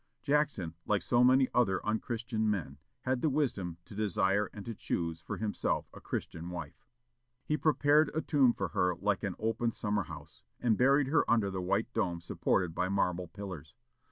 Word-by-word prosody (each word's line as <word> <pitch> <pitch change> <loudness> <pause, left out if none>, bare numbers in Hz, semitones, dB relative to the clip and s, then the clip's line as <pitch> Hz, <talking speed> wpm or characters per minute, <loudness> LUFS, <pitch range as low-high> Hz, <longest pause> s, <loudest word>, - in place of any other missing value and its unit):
Jackson, 140 - +1
like 105 -2 +1
so 120 0 +3
many 130 +1 +5
other 95 -7 +3
unchristian 110 +1 -1
men, 75 -9 -2 0.2
had 130 -1 -1
the 155 - +2
wisdom 110 - -1
to - - -12
desire 100 0 +1
and 100 - -9
to 115 - -4
choose 85 -5 -3
for - - -5
himself 105 -1 -1
a - - -11
Christian 85 +1 -5
wife. 90 +7 -8 0.6
He 150 - +1
prepared 150 +1 +4
a 160 - +1
tomb 135 -5 +4
for 95 -6 -3
her 90 +3 +1
like 100 0 0
an 100 -3 -3
open 115 +2 0
summer 105 -2 -1
house, - - -11 0.2
and 115 -3 +2
buried 135 +3 +4
her 155 +1 +4
under 110 -4 +3
the 95 -1 -3
white 100 +6 0
dome 90 -6 0
supported 85 0 0
by 90 +2 -1
marble 90 -2 0
pillars. 90 -5 -8
105 Hz, 180 wpm, -32 LUFS, 90-125 Hz, 0.6 s, many